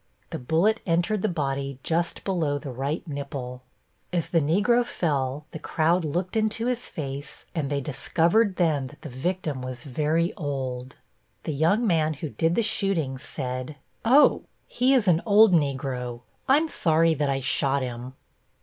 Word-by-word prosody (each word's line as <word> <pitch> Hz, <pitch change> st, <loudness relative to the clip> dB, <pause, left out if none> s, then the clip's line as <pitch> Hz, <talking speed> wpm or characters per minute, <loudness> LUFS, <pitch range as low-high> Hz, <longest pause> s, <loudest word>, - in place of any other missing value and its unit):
The -, -, -4 dB
bullet 165 Hz, -, +2 dB
entered 175 Hz, +5 st, +1 dB
the 215 Hz, -, +1 dB
body 140 Hz, -4 st, -2 dB
just 170 Hz, +1 st, -1 dB
below 160 Hz, -7 st, 0 dB
the 140 Hz, -2 st, -6 dB
right 140 Hz, +7 st, -3 dB
nipple. 140 Hz, -4 st, -5 dB, 0.5 s
As 170 Hz, -2 st, -1 dB
the 165 Hz, -2 st, +3 dB
Negro 205 Hz, +11 st, +3 dB
fell 145 Hz, -, -2 dB
the 160 Hz, -, -7 dB
crowd 165 Hz, +4 st, +1 dB
looked 175 Hz, +6 st, -2 dB
into 220 Hz, +1 st, +1 dB
his 250 Hz, 0 st, -1 dB
face 140 Hz, -1 st, -6 dB
and 155 Hz, -5 st, -2 dB
they 140 Hz, -1 st, -1 dB
discovered 175 Hz, -, +1 dB
then 155 Hz, -7 st, +1 dB
that 145 Hz, -, -16 dB
the 155 Hz, -, -6 dB
victim 150 Hz, +1 st, -3 dB
was 130 Hz, -1 st, -6 dB
very 155 Hz, +5 st, 0 dB
old. 135 Hz, -5 st, -4 dB, 0.5 s
The 155 Hz, -, -3 dB
young 170 Hz, -, +2 dB
man 160 Hz, -5 st, +2 dB
who 150 Hz, +2 st, -5 dB
did 165 Hz, +4 st, 0 dB
the 230 Hz, -, +2 dB
shooting 175 Hz, -11 st, 0 dB
said: 130 Hz, 0 st, -5 dB, 0.3 s
"Oh, 265 Hz, +6 st, +5 dB, 0.2 s
he 255 Hz, +2 st, +2 dB
is 230 Hz, -6 st, +2 dB
an 170 Hz, -2 st, +4 dB
old 210 Hz, -1 st, +6 dB
Negro. 130 Hz, -5 st, -1 dB, 0.3 s
I'm 295 Hz, +5 st, +4 dB
sorry 165 Hz, -, +2 dB
that 145 Hz, -2 st, 0 dB
I 135 Hz, 0 st, 0 dB
shot 135 Hz, +1 st, +1 dB
him." 125 Hz, +1 st, -6 dB
155 Hz, 160 wpm, -25 LUFS, 135-180 Hz, 0.5 s, old